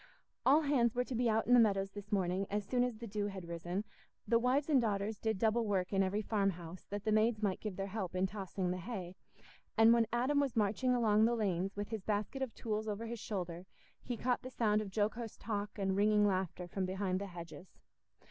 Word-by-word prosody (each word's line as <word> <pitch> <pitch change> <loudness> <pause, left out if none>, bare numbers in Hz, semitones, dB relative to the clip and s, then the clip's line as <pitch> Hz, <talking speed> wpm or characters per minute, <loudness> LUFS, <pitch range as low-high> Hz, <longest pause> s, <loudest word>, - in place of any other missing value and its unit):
All 290 +4 +7
hands 255 -6 +2
were 250 - +2
to 255 - -6
be 240 0 +2
out 220 0 +2
in 245 - +3
the 245 - +8
meadows 195 -3 +3
this 205 +1 -9
morning 190 -1 0
as 205 0 -1
soon 245 +4 +1
as 245 -3 -2
the 235 - -7
dew 205 -1 -2
had 190 -4 -7
risen; 175 +4 -3 0.4
the 230 +2 +4
wives 260 +4 +2
and 285 -5 +4
daughters 210 -1 -1
did 220 -2 0
double 225 +3 +2
work 195 -3 -1
in 195 - +3
every 200 +3 0
farmhouse, 185 -5 -2
that 205 0 -5
the 215 - 0
maids 215 0 +2
might 195 -3 0
give 210 -4 -5
their 195 - -3
help 195 -3 -4
in 185 +1 +2
tossing 190 -2 -3
the 180 - -2
hay; 185 -3 -6 0.6
and 225 +1 +7
when 230 -1 +3
Adam 255 +5 +2
was 280 -4 0
marching 225 +4 +2
along 220 -2 +4
the 235 +1 +2
lanes, 195 -3 -1
with 205 0 -4
his 220 -2 -4
basket 210 +6 -2
of 265 -3 -1
tools 220 -1 -3
over 215 +2 -3
his 230 0 -5
shoulder, 180 -4 -5 0.3
he 245 -2 -4
caught 245 +2 0
the 255 - -7
sound 215 -4 +1
of 210 - -5
jocose 220 +2 -2
talk 205 -1 -4
and 195 -1 0
ringing 210 +1 +4
laughter 185 -2 -1
from 190 +2 -3
behind 190 0 -1
the 200 - -4
hedges. 175 0 -10
210 Hz, 225 wpm, -34 LUFS, 195-230 Hz, 0.6 s, the